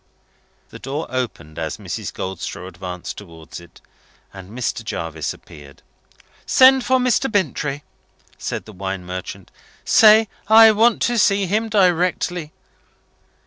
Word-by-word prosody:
The - - -12
door 140 +4 -4
opened 95 -12 -5
as 80 -1 -4
Mrs. - - -6
Goldstraw 95 -1 -6
advanced 90 -1 -7
towards 85 -6 -12
it; 85 -1 -18 0.5
and 95 -1 -11
Mr. 115 0 -4
Jarvis 80 -6 -4
appeared. 70 -2 -14 0.6
"Send 260 0 +5
for 260 +1 +2
Mr. 250 +1 +1
Bintrey," 145 - -2 0.6
said - - -5
the - - -12
wine 95 -1 -5
merchant. 90 +1 -8 0.3
"Say 220 0 +6 0.2
I 220 +1 +8
want 225 +2 +2
to 240 -1 +1
see 200 -1 +3
him 215 +5 -1
directly." 180 -4 0
135 Hz, 125 wpm, -20 LUFS, -, 0.6 s, I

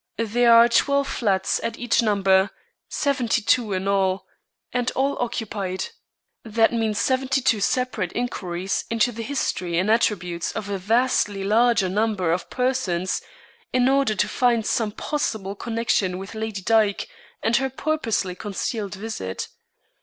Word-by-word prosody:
There 235 +2 +3
are 230 0 +8
twelve 280 +3 +2
flats 195 -7 0
at 230 - -3
each 240 -1 +2
number, 195 -3 +3 0.4
seventy 265 -6 0
two 225 0 +1
in 190 0 -2
all, 195 -1 +1 0.5
and 245 0 +1
all 275 +2 +1
occupied. 205 -6 -3 0.5
That 225 +1 +2
means 220 -2 0
seventy 265 +2 +1
two 235 -4 +2
separate 240 -5 0
inquiries 190 -6 -2
into 230 +1 +2
the 230 0 -6
history 185 -9 -2
and 190 +5 +2
attributes 180 -7 0
of 215 -2 -5
a 195 - -2
vastly 210 -1 +1
larger 220 0 +3
number 200 -3 0
of 175 +1 -2
persons, 250 -9 -1 0.5
in 250 0 +3
order 270 -5 +2
to 205 - +1
find 235 -1 +1
some 220 -3 0
possible 215 -7 -3
connection 220 -4 -1
with 195 +3 -8
Lady 220 -2 -4
Dyke 215 -1 +2 0.4
and 230 - +3
her 265 0 0
purposely 260 -9 -1
concealed 205 +2 -4
visit. 190 - -5
220 Hz, 140 wpm, -23 LUFS, 195-245 Hz, 0.5 s, are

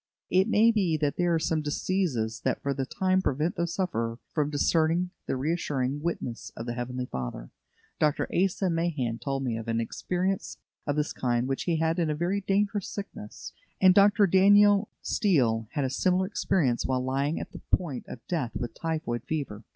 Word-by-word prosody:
It 185 +2 +4
may 225 +2 +5
be 185 -8 +1
that 145 -2 -1
there 175 -1 +2
are - - +3
some 160 0 0
diseases 145 - -1
that - - 0
for 140 - 0
the 135 -1 -3
time 185 +3 +1
prevent 155 +4 0
the 170 -2 0
sufferer 140 - -2 0.2
from 150 -2 +1
discerning 165 +4 +2 0.2
the - - 0
reassuring 140 -2 -1
witness 150 -8 -4
of 115 - -5
the 120 - -3
Heavenly 125 +1 -3
Father. - - -6 0.5
Dr. 150 -2 +2
Asa 190 0 +1
Mahan 150 -9 -1
told 135 -1 -2
me 120 -3 -1
of 115 0 -7
an 115 0 0
experience 180 +11 -2 0.3
of 145 - +1
this 150 0 -1
kind 120 -1 0
which 135 0 -2
he 170 - +1
had 160 +2 +1
in 165 -2 +1
a 150 - 0
very 180 +6 -1
dangerous 200 +1 0
sickness. 195 - -8 0.3
And 185 -1 +7
Dr. 205 +1 +5
Daniel 205 +2 +5
Steele 120 - +2
had 145 -4 0
a - - 0
similar 185 +5 +2
experience 175 - +1
while 130 -1 0
lying 135 +4 0
at - - -7
the - - -10
point 150 -9 -1
of - - -10
death 150 -9 -2
with 120 -2 -3
typhoid 155 -8 -3
fever. 125 -9 -4
155 Hz, 185 wpm, -28 LUFS, 125-185 Hz, 0.5 s, And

